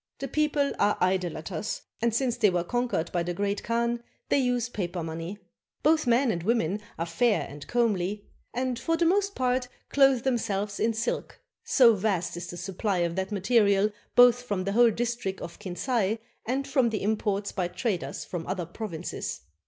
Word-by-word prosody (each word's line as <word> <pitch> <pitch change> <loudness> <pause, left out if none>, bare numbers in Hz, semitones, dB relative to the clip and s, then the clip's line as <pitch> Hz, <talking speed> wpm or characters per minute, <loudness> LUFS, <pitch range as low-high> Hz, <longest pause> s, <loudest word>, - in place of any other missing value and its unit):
The 275 - -4
people 295 0 +1
are 205 - +3
idolaters; 180 0 -1 0.2
and 235 0 +2
since 240 +1 +1
they 225 -4 +4
were 175 -2 0
con 245 +7 0
quered 165 - -1
by 175 - 0
the 175 +1 -3
Great 200 +1 -1
Khan 235 +1 0 0.3
they - - +4
use 250 -2 +1
paper 180 -7 -3
money. 165 +4 -5 0.5
Both 310 -2 +3
men 240 +1 +4
and 170 - -2
women 205 -1 +1 0.2
are 165 - -1
fair 205 +6 +1
and 145 +1 -10
comely, 210 -4 0 0.3
and 250 0 -2
for 330 0 0
the 340 - +2
most 400 +3 +2
part 250 0 +1 0.2
clothe 270 -3 +4
themselves 210 -5 -1
in 225 0 +1
silk, 230 +2 -3 0.2
so 240 -4 +6
vast 190 -5 -1
is 175 0 -6
the 175 - -7
supply 190 +2 -2
of 170 0 -3
that 190 +1 -2
material, 205 0 +3 0.2
both 245 0 +7
from 205 -6 -2
the 195 - -1
whole 235 +3 +6
district 230 -4 -2
of 170 - -8
Kinsay 210 +2 -1 0.3
and 270 +3 -1
from 265 -4 +3
the 215 -3 -3
imports 205 -1 0
by 185 -3 -1
traders 180 - -3
from 170 -3 -5
other 185 -2 -2
provinces. 175 -1 -5
215 Hz, 180 wpm, -27 LUFS, 185-245 Hz, 0.5 s, both